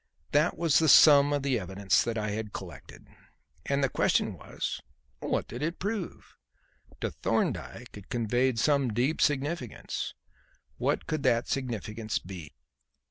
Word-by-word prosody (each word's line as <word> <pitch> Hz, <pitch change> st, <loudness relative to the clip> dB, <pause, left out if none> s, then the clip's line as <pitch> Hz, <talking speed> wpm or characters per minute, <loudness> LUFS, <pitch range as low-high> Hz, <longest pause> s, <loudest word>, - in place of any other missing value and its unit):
That 150 Hz, +4 st, +2 dB
was 165 Hz, -3 st, +3 dB
the 160 Hz, -1 st, +3 dB
sum 145 Hz, -1 st, +8 dB
of 145 Hz, -1 st, 0 dB
the 135 Hz, -4 st, +1 dB
evidence 95 Hz, +1 st, +1 dB
that 115 Hz, -1 st, -2 dB
I 105 Hz, -1 st, -2 dB
had 105 Hz, 0 st, -4 dB
collected; 85 Hz, -7 st, -10 dB, 0.6 s
and 140 Hz, 0 st, +1 dB
the -, -, +4 dB
question -, -, +1 dB
was, -, -, -5 dB, 0.4 s
What -, -, -1 dB
did 120 Hz, -, -7 dB
it 165 Hz, +3 st, -2 dB
prove? 205 Hz, -2 st, -4 dB, 0.7 s
To -, -, -1 dB
Thorndyke -, -, -2 dB
it 100 Hz, -2 st, -12 dB
conveyed 120 Hz, +1 st, +1 dB
some 135 Hz, -1 st, +2 dB
deep 130 Hz, +7 st, +1 dB
significance. 145 Hz, -3 st, -1 dB, 0.6 s
What -, -, 0 dB
could 155 Hz, -2 st, -2 dB
that 120 Hz, -4 st, +2 dB
significance 110 Hz, -4 st, -3 dB
be? 90 Hz, -5 st, -8 dB
125 Hz, 140 wpm, -29 LUFS, 110-145 Hz, 0.7 s, sum